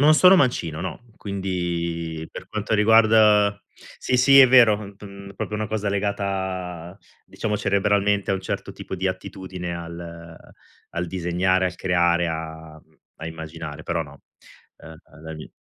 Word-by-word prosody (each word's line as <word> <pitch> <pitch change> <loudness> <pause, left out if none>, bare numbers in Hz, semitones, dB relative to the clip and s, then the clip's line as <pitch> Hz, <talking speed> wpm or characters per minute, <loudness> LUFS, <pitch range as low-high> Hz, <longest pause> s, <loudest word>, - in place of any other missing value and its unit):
Non 155 +2 +6
sono 185 +3 +7
mancino, 85 - 0
no, 90 -2 -5 0.2
quindi 85 -4 -3
per - - -9
quanto 105 0 -2
riguarda 105 -1 +5 0.4
sì, 125 - 0
sì 135 +2 +6
è 135 - +10
vero 110 -5 +4
p - - -24
mhmm, 100 0 -11
proprio 105 - -4
una 110 0 -2
cosa 105 -1 -2
legata, 95 -3 -3 0.3
diciamo 105 -1 -3
cerebralmente 100 0 +1
a - - +2
un 95 - -3
certo 95 - -5
tipo - - -7
di 95 +1 -1
attitudine 95 -1 -6
al 85 -1 -9 0.6
al 85 +1 -3
disegnare, 95 +1 0
al 90 - -4
creare, 85 -1 +2
a 80 -1 -7 0.4
a - - -4
immaginare, 80 0 -7
però - - -2
no, 70 -2 -15 0.5
ehm, 80 0 -13 0.3
dagli 80 -1 -9
95 Hz, 145 wpm, -23 LUFS, 85-105 Hz, 0.6 s, è